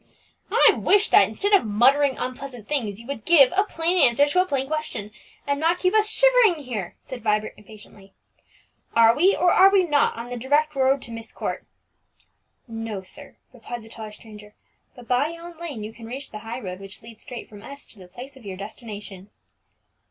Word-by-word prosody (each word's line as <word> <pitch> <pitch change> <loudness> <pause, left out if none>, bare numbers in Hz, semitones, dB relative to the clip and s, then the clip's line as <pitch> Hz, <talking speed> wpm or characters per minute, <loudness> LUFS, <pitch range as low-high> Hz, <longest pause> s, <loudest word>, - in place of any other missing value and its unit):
"I - - +5
wish 410 +2 +3
that, - - +6
instead 405 +1 -2
of 400 - +6
muttering 260 +6 +3
unpleasant 255 -3 -7
things, 225 -9 -2
you 230 - -13
would 260 -4 -6
give 295 -2 +5
a 395 - +4
plain 345 -1 -1
answer 250 +4 +5
to 325 +5 +2
a 370 - -2
plain 270 -4 -1
question, 305 -8 -5 0.3
and 280 0 -1
not 330 +3 +1
keep 365 +1 0
us 430 -1 +3
shivering 450 -8 +4
here!" 215 -9 -5
said 255 -2 -10
Vibert 215 0 -1
impatiently. 205 -1 -16 0.8
"Are 230 0 +6
we, 370 +8 +3
or 355 0 +2
are 385 - +7
we 390 -1 +3
not, 295 -4 +1
on 235 +1 -7
the 245 - -4
direct 290 +5 +1
road 270 -1 +1
to 235 - -7
Myst 230 -1 -8
Court?" - - -5 1.0
"No, 225 -4 -6
sir," 185 - -12 0.2
replied 240 -1 -8
the 220 - -14
taller 220 -1 -9
stranger; 210 -1 -14 0.4
"but 245 -3 -14
by 250 +4 +2
yon 335 0 -10
lane 290 -11 -6
you 215 +1 -8
can 230 -1 -12
reach 270 +4 -7
the 215 - -7
high 230 +3 -7
road 185 -4 -7
which 195 +3 -12
leads 225 -1 -13
straight 250 -5 -9
from 205 -1 -14
S 280 +5 -11
to 215 - -19
the 185 - -13
place 250 +9 -11
of 265 - -16
your 195 -2 -7
destination." 205 -2 -9
250 Hz, 200 wpm, -23 LUFS, 215-305 Hz, 1.0 s, are